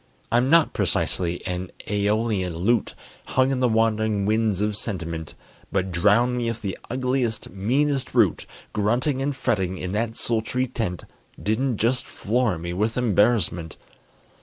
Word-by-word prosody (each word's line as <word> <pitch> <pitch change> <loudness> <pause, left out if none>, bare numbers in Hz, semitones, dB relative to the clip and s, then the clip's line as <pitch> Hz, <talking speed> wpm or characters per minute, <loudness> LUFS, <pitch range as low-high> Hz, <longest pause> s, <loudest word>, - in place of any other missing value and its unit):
I'm 120 +3 +3
not 165 0 +5
precisely 90 -1 -1
an 90 0 -3 0.2
æolian 105 -3 0
lute 105 +7 +1 0.3
Hung 130 +1 +2
in 130 - 0
the 125 -1 +3
wandering 110 -2 +1
winds 110 -2 +1
of 105 0 0
sentiment, 85 -7 -5 0.4
But 95 -1 0
drown 105 +8 +3
me 120 -1 0
if 115 0 -4
the 100 -2 -3
ugliest, 125 -2 -1
meanest 130 +8 0
brute - - +2 0.3
Grunting 120 +6 +1
and 140 0 -1
fretting 95 -8 0
in 90 0 -4
that 115 +2 -1
sultry 120 +3 -1
tent 110 -9 -3 0.4
Didn't 115 +3 0
just 120 +4 +1
floor 110 -3 0
me 85 +1 -5
with 110 +6 -1
embarrassment! 105 -8 +1
110 Hz, 140 wpm, -24 LUFS, 95-125 Hz, 0.4 s, not